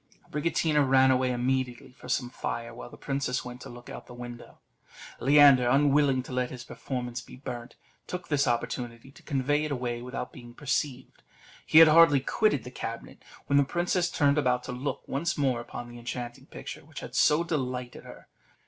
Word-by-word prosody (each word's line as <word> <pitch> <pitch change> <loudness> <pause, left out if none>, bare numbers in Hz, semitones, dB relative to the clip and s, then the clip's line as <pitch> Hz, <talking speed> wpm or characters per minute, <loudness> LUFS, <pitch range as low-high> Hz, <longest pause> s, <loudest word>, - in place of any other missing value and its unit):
Abricotina 150 0 +1
ran 130 0 +5
away 130 0 +2
immediately 125 0 -1
for 125 - -13
some 125 -2 -1
fire, 115 -2 -4
while 120 - -9
the - - -13
princess 135 -3 -2
went 125 0 -8
to - - -9
look 120 0 -12
out - - -7
at - - -12
the 125 - -11
window. 120 0 -9 0.6
Leander, 140 -2 +6
unwilling 140 -1 +3
to - - -10
let 125 0 -1
his 125 -2 -8
performance 125 -2 -5
be - - -13
burnt, 125 -2 -7 0.3
took 180 -1 -5
this 145 -2 +1
opportunity 120 +1 -3
to - - -17
convey 145 +1 0
it 155 - -3
away 120 -3 -2
without 125 0 -6
being 120 -1 -12
perceived. 135 -2 -3 0.5
He - - +4
had 165 0 +11
hardly 155 -2 +7
quitted 145 - +1
the 125 - -9
cabinet, 115 -2 -7 0.2
when 140 - +2
the 140 - +6
princess 175 +4 0
turned 145 -3 +2
about 125 -3 +1
to - - -6
look 125 +4 -4
once 150 +5 -1
more 130 -4 +1
upon 120 0 -8
that 120 - -10
enchanting 120 0 -6
picture, - - -8
which - - -10
had - - -9
so 150 +3 +4
delighted 125 -6 -3
her. - - -13
130 Hz, 190 wpm, -28 LUFS, 125-145 Hz, 0.6 s, had